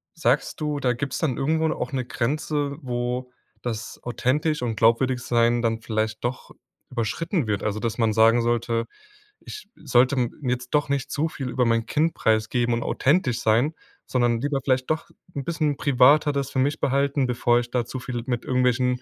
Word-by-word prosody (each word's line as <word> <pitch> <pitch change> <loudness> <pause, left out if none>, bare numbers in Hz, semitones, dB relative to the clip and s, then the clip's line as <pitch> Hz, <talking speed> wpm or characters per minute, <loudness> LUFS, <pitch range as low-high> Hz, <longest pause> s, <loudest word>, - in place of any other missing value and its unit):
sagst - - 0
du, 150 -1 -1
da 125 -3 +1
gibt's 130 +2 -3
dann 140 -7 0
irgendwo 160 +3 +1
da - - -1
auch 125 - -4
'ne 130 -2 -1
Grenze, 145 +3 -2
wo 125 -1 -3 0.3
das 115 -2 -5
authentisch 150 +5 0
und 115 -2 -1
glaubwürdig 120 +4 +3
sein 120 0 +2
dann 115 -1 -1
vielleicht 110 0 -2
doch 120 +2 -4 0.4
überschritten 130 - -1
wird? 105 -2 -1
Also, 105 0 -1
dass 115 0 -2
man 115 -3 +2
sagen 115 +2 +5
sollte: 115 0 0 0.5
„Ich 425 - -10
sollte 130 -2 +2
m 120 -2 +1 0.2
jetzt 125 0 -2
doch 150 -1 +2
nicht 140 0 -1
zu 155 +3 0
viel 135 -4 -5
über 125 0 +1
mein 115 -1 +1
Kind 160 +2 +1
preisgeben 110 +2 +1
und 115 - -2
authentisch 135 -5 +1
sein, 115 +8 +2 0.3
sondern 120 -2 +1
lieber 145 0 0
vielleicht 130 -1 0
doch 155 - -2 0.3
'n 140 - -3
bisschen 155 -3 0
privater 140 +3 +4
das 140 -1 -2
für 130 - -1
mich 145 +4 +1
behalten, 140 0 +1
bevor 120 -1 +2
ich 120 0 -5
da 125 -2 0
zu 130 +2 -6
viel 120 -1 -5
mit 120 -2 -2
irgendwelchen 125 0 +1
125 Hz, 185 wpm, -24 LUFS, 120-140 Hz, 0.5 s, sagen